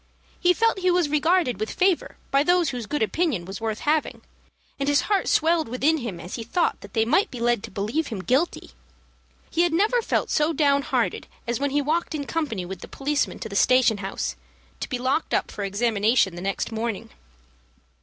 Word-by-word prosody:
He 355 - +4
felt 455 0 +1
he 370 -1 +2
was 350 -4 +2
regarded 305 - +2
with 215 0 -2
favor 370 -2 +1
by 275 - +4
those 350 +1 +3
whose 245 -4 -5
good 295 -1 0
opinion 255 - 0
was 195 +4 -7
worth 220 -1 -3
having, 305 +1 0 0.6
and 275 +1 0
his 285 -2 +4
heart 400 +3 0
swelled 320 -4 +2
within 280 +6 +2
him 220 -9 -5
as 175 +2 -9
he 230 - -5
thought 330 +10 0
that 200 - -12
they 220 0 +3
might 330 - +2
be 250 - -8
led 240 -2 +1
to - - -8
believe 215 +11 -2
him 205 -6 -5
guilty. 260 - 0 0.8
He 335 - +2
had 345 -2 +2
never 430 +8 +3
felt - - -1
so 300 +2 +2
down 280 -2 +3
hearted - - -1 0.2
as 235 +1 -2
when 285 0 0
he 290 +1 +1
walked 320 +3 -1
in 285 -2 -3
company 275 - -2
with 190 0 -7
the - - -8
policeman 285 +1 -1
to 220 - -5
the 200 - -7
station 250 -1 +4
house, 195 0 -3 0.4
to - - -5
be 255 - -1
locked 260 +6 0
up - - -1
for 205 - -5
examination 205 -1 +2
the 175 - -7
next 195 +4 -2
morning. 225 0 -4
270 Hz, 205 wpm, -24 LUFS, 220-320 Hz, 0.8 s, He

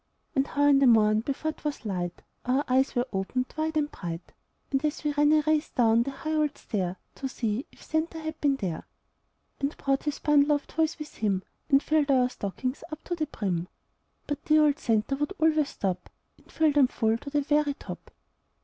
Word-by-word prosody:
And 270 0 +2
how 290 0 +1
in 285 -1 +6
the 275 - +5
morn, 215 -2 +5
before 280 +6 -2
'twas 295 -5 -5
light, 180 -3 -3 0.2
Our 260 +4 +1
eyes 265 +1 +2
were 245 0 +2
opened 225 +7 -2
wide 315 0 -1
and 295 -1 0
bright, 170 -1 -7 0.5
As 300 0 -1
we 295 -1 0
ran 295 0 +4
a 310 0 +5
race 310 0 +2
down 230 -1 +3
the 255 - -1
high 310 +3 -4
old 300 -2 +1
stair, 185 -4 -3 0.2
To 270 - -4
see 230 0 -2
if - - -18
"Santa" 320 +1 -1
had 315 0 -6
been 285 -2 +3
there, 185 -10 -4 0.7
And 280 +1 -2
brought 275 0 0
his 295 -1 -1
bundle 295 0 +4
of 290 - -1
toys 320 +1 0
with 305 -2 -9
him, 195 -3 0 0.3
And 275 -1 +5
filled 305 -2 +2
our 255 -2 +4
stockings 255 +5 -4
up 310 - -7
to 350 - -3
the 310 -3 -2
brim? 185 - -2 0.6
But 290 - -4
dear 310 0 +5
old 290 -1 +2
"Santa" 225 +3 +1
would 295 +7 -1
always 310 -4 +3
stop 185 -2 -3 0.3
And - - -22
fill 315 -1 +3
them 285 -2 +5
full 225 -2 0
to 280 - -8
the 290 0 +1
very 290 0 +1
top. - - -9
280 Hz, 205 wpm, -27 LUFS, 230-300 Hz, 0.7 s, in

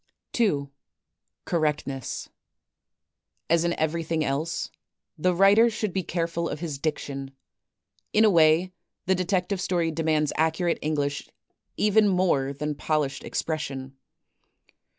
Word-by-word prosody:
2. 145 - +1 0.7
Correctness 150 -5 -2 1.2
As 170 0 +4
in 170 0 0
everything 160 0 -1
else, 150 +5 -2 0.4
the 180 +3 +1
writer 200 +5 +6
should 215 -4 -3
be 190 - 0
careful 170 -1 -2
of 145 - -4
his 155 -5 -4
diction. 140 -3 -4 0.8
In 215 +1 +5
a - - +6
way, 165 +2 +4 0.3
the 190 - +3
detective 185 +1 0
story 175 -3 0
demands 155 -2 0
accurate 160 +2 +1
English 145 -2 -2 0.5
even 210 0 +4
more 180 -8 +2
than 150 +2 -3
polished 145 -2 -1
expression. 135 -4 -4
160 Hz, 110 wpm, -26 LUFS, 150-180 Hz, 1.2 s, writer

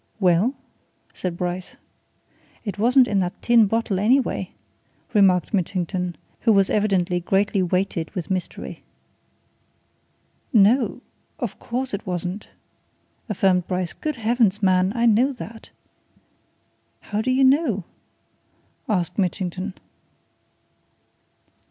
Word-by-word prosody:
"Well?" 190 +7 +3 0.6
said 175 -2 -4
Bryce. 180 +1 -4 0.9
"It 200 -2 -5
wasn't 250 +3 +5
in 200 -4 +1
that 180 -1 -2
tin 235 -3 +5
bottle, 225 -2 0
anyway," 250 +6 +1 0.6
remarked 190 -2 +3
Mitchington, 180 -1 -1 0.2
who 230 - +3
was 195 -2 +3
evidently 190 -4 +1
greatly 195 +3 +1
weighted 180 -2 -1
with 180 0 -4
mystery. 185 -2 -4 1.7
"No! 230 +2 +3 0.4
of - - -5
course 250 +1 -3
it 200 +1 -5
wasn't!" 180 +2 -4 0.8
affirmed 185 -3 +2
Bryce. 180 -1 -2
"Good 305 -1 -4
Heavens, 225 -3 +1
man 185 0 +3
I 235 0 +1
know 235 +5 +4
that!" 225 -2 -10 1.3
"How 210 0 -3
do 250 - -2
you 260 +1 +3
know?" 260 - +3 1.1
asked 185 -2 -1
Mitchington. 185 +1 -2
200 Hz, 105 wpm, -23 LUFS, 180-230 Hz, 1.7 s, wasn't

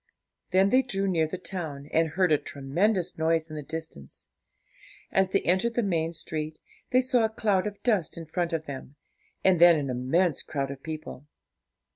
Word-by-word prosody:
Then 190 +2 +3
they 255 - +6
drew 195 -6 -2
near 165 -4 +2
the 185 - -5
town, 160 -7 -5
and 160 0 +3
heard 180 +2 +1
a 150 - +4
tremendous 175 +7 -1
noise 160 0 +1
in - - -6
the 150 - -4
distance. 160 - -8 0.9
As 190 -1 +3
they 195 - +1
entered 190 +7 +1
the 240 - +2
main 165 -4 0
street, 155 -1 -5 0.3
they 255 0 +4
saw 250 -2 +2
a 220 - +2
cloud 210 -3 +1
of 205 -1 -8
dust 210 -11 +1
in 165 - -6
front 170 +2 -2
of 160 -1 -2
them, 140 -1 -8 0.5
and 185 -3 +4
then 175 -1 +9
an 140 -4 -2
immense 140 +6 +1
crowd 140 -2 -3
of 135 -1 -8
people. 155 -3 -7
165 Hz, 185 wpm, -27 LUFS, 155-190 Hz, 0.9 s, then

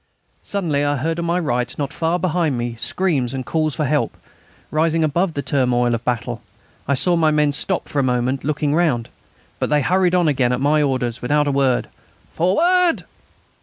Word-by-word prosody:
Suddenly 165 -8 -1
I 145 0 +1
heard 160 +5 -2
on 170 - -2
my 170 +1 +1
right, 125 -8 -1
not 145 -1 -3
far 165 +5 0
behind 165 -5 0
me, 120 0 -3
screams 140 -10 -1
and 130 -1 -4
calls 155 -1 0
for 150 - -1
help, 145 +1 0 0.5
rising 160 +1 +1
above 165 +3 0
the 140 - -2
turmoil 125 -3 +1
of 115 - -2
battle. 115 - -2 0.5
I 140 - +2
saw 175 +6 +2
my 160 -2 +3
men 150 -1 +2
stop 180 +6 -2
for 145 - -2
a - - +2
moment, 125 +1 0
looking 150 0 0
round. 150 -9 +1 0.5
But - - -1
they 150 0 +3
hurried 180 +1 +2
on 175 -2 +3
again 130 -4 +2
at 125 - -1
my 150 +3 +2
orders 130 -4 -1
without 145 +4 +1
a - - +2
word. 135 -2 +1 0.4
"Forward!" 340 - +2
145 Hz, 190 wpm, -20 LUFS, 130-165 Hz, 0.5 s, my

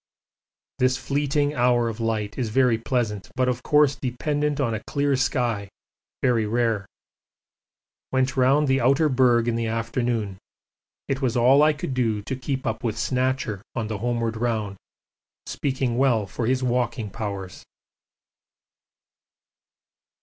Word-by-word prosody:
This 130 +1 +3
fleeting 145 +1 0
hour 120 -3 +2
of 115 -1 -5
light 110 -2 -2
is 125 -4 -2
very 120 -1 +3
pleasant, 115 -5 -2
but 130 0 +1
of 125 -1 -1
course 150 -1 +3
dependent 145 +3 -2
on 120 -5 +1
a 110 - -4
clear 140 -1 +1
sky, 120 -6 0 0.5
very 115 -4 +2
rare. 115 -3 0 1.2
Went 130 -1 +1
round 135 +3 +3
the 135 0 +2
outer 140 +6 +3
berg 120 -3 +3
in 120 - +1
the 115 -1 -1
afternoon; 115 -3 -2 0.7
it 135 0 -2
was 125 -2 0
all 130 +4 +5
I 155 0 +5
could 145 -2 -4
do 115 -5 0
to 130 - -3
keep 130 +1 -4
up 110 +1 -2
with 115 -2 -2
'Snatcher' 125 -3 -1
on 115 -3 -2
the 105 -3 -3
homeward 115 0 -1
round 110 -4 -2 0.7
speaking 130 -3 -2
well 120 -6 +3
for 110 +4 -4
his 130 +1 +1
walking 120 -4 -1
powers. 100 -4 -6
120 Hz, 140 wpm, -24 LUFS, 115-130 Hz, 1.2 s, all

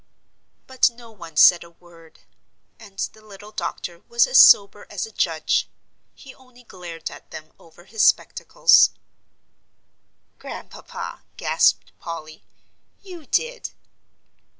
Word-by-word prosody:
But 260 -1 +2
no 235 -1 -16
one 170 -7 -13
said 175 +2 +6
a 170 - -16
word. 170 -1 -21 0.6
And 200 -3 -16 0.2
the 215 - -20
little 210 0 -14
doctor - - -6
was 470 0 +3
as - - +4
sober 200 0 +5
as 205 -3 -5
a 220 - -14
judge. 160 -6 -1 0.5
He 265 - -14
only 255 -1 -21
glared 175 -6 -9
at - - -15
them 155 0 -11
over 170 +1 -20
his 220 +2 -4
spectacles. - - +3 1.5
"Grandpapa," - - -9 0.2
gasped - - +1
Polly, 155 -2 -9 0.6
"you 355 -6 -12
did." 485 +1 -2
200 Hz, 120 wpm, -21 LUFS, 170-245 Hz, 1.5 s, said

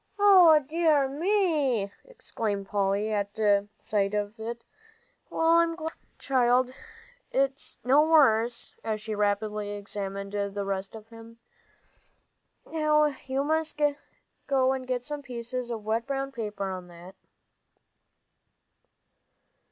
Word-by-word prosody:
"O 370 -6 +7
dear 310 -3 +3
me!" 295 - +1
exclaimed 215 - -4
Polly, 205 +2 0
at 205 0 -2 0.4
sight 205 -1 -1
of 210 +2 -3
it. 235 +1 -6 0.7
"Well, 325 - -1
I'm 335 0 +1
glad, 320 -1 -5 0.2
child, 255 -1 +2 0.6
it's 270 +1 -1
no 270 +4 +5
worse," 245 -7 +3
as 215 -1 -2
she 215 +1 -5
rapidly 210 0 -1
examined 200 -1 -5
the 200 0 -2
rest 195 +1 -4
of 220 0 -12
him. 230 0 -13 1.3
"Now 300 -2 +2
you 265 +1 0
must 315 +1 -1
have 265 -3 -1
some 295 -1 -4
pieces 245 -1 -5
of 225 -3 -5
wet 225 +2 -1
brown 275 0 -2
paper 210 -5 -4
on 185 -1 -7
that." 175 +2 -13
240 Hz, 110 wpm, -27 LUFS, 205-290 Hz, 1.3 s, O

